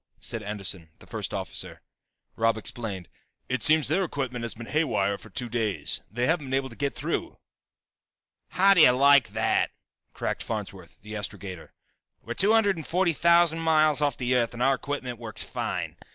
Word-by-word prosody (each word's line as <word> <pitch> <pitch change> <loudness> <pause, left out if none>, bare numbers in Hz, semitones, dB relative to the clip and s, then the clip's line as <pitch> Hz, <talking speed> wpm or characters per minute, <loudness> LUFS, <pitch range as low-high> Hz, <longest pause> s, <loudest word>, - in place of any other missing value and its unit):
said 115 - -4
Anderson, 100 -5 -4
the - - -17
first - - -4
officer. - - -5 0.5
Robb 115 0 +2
explained. 105 -5 -4 0.4
"It 130 0 -2
seems 155 -2 +5
their 170 +7 +1
equipment 130 -7 -3
has 115 -1 -3
been 115 +1 -8
haywire 105 -10 0
for 110 - -13
two 120 +5 -3
days, 115 -4 0
they 120 +3 -1
haven't 160 -2 0
been 130 - -1
able 135 0 -1
to 115 - -12
get 140 +2 -2
through." - - -3 1.1
"How 195 +2 +4
do 180 - +5
you - - +9
like 140 0 +5
that!" - - +1 0.5
cracked - - -3
Farnsworth, 95 -6 -6
the 105 0 -9
astrogator. 95 -3 -6 0.5
"We're 120 - -5
two 195 - +4
hundred 205 -5 +3
and 160 - -7
forty 175 0 +1
thousand 170 0 +4
miles 155 -2 +3
off 145 -3 +1
the 125 0 0
Earth 120 -1 +1
and 120 - -2
our 135 +1 +4
equipment 130 -3 -4
works 110 -3 -1
fine. - - -4
125 Hz, 180 wpm, -26 LUFS, 110-155 Hz, 1.1 s, you